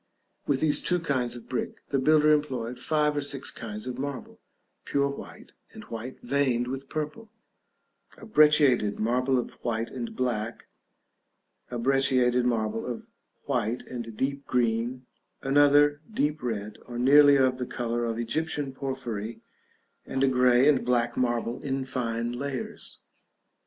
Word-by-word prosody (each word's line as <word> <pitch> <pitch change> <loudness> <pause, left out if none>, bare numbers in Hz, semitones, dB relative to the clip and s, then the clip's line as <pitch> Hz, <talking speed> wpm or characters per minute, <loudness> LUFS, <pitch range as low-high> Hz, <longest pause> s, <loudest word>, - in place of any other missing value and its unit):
With 135 -2 +1
these 155 -2 +3
two 180 0 +1
kinds 130 -7 -1
of 120 - -10
brick, 125 - -3
the 135 - +1
builder 155 +2 +5
employed 125 -5 0
five 150 +1 +1
or 145 - 0
six 140 -1 -3
kinds 105 -1 -6
of 125 0 -5
marble: 140 -1 -5 0.4
pure 140 0 +1
white, 140 - -10 0.2
and - - -10
white 115 +3 -6
veined 125 -2 +1
with 135 +1 -5
purple; 155 +9 -5 0.9
a - - -11
brecciated 150 - +4
marble 125 +4 +1
of 125 - -5
white 115 -1 -2
and 120 -3 -5
black; 115 -3 -2 1.0
a 125 - -4
brecciated 125 -1 +2
marble 115 -2 0
of 120 -2 -5 0.4
white 120 -3 -1
and 115 -3 -7
deep 140 +1 -2
green; 120 +1 0 0.4
another, 145 +1 +4
deep 150 -6 0
red, 105 -3 -4
or 120 - -6
nearly 145 +3 +7
of 130 -1 +2
the 125 - -3
color 120 0 -2
of 115 -1 -2
Egyptian 140 +3 -1
porphyry; 120 -5 -4 0.6
and 135 0 -1
a - - +5
grey 125 0 +4
and 145 -3 +4
black 120 -1 +1
marble, 120 -1 -1
in 135 -1 -2
fine 115 -2 -2
layers. 130 +1 -5
130 Hz, 145 wpm, -27 LUFS, 120-140 Hz, 1.0 s, nearly